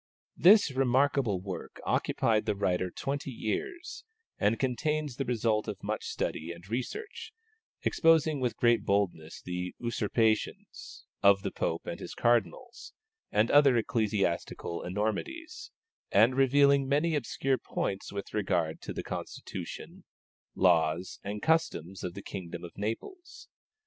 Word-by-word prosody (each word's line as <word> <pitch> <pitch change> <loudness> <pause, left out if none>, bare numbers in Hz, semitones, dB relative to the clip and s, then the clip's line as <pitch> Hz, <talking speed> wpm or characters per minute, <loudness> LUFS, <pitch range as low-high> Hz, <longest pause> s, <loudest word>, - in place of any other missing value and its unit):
This 200 -3 +6
remarkable 130 -4 +2
work 95 -1 -7
occupied 110 -1 +1
the 105 - +1
writer 90 -2 0
twenty 140 +8 -4
years, 365 - -4 0.4
and 105 +2 +2
contains 145 +2 -1
the 135 - -1
result 115 -3 0
of 105 -3 -6
much - - -3
study 80 +2 -3
and 85 +2 -11
research, 130 - -5 0.5
exposing 160 -2 +3
with 125 -3 -1
great 120 -3 +3
boldness 95 -6 -1
the 90 0 -4
usurpations 115 -1 -1 0.2
of 100 -1 +5
the - - -2
Pope 80 - -2
and - - -5
his - - -7
cardinals, 120 - 0 0.4
and 110 +2 +2
other 140 -4 +6
ecclesiastical 100 -6 -1
enormities, 325 - -3 0.4
and 110 +6 +5
revealing 140 0 +4
many 150 +4 +2
obscure 135 -1 0
points 95 0 -3
with 100 -1 -6
regard 90 -6 0
to - - -6
the - - -4
constitution, - - -7 0.5
laws, 85 -1 +2
and 105 +1 -5
customs 130 - 0
of 90 -1 -4
the 100 - -8
kingdom 85 -2 -7
of 85 - -9
Naples. 345 - -6
115 Hz, 130 wpm, -30 LUFS, 95-140 Hz, 0.5 s, This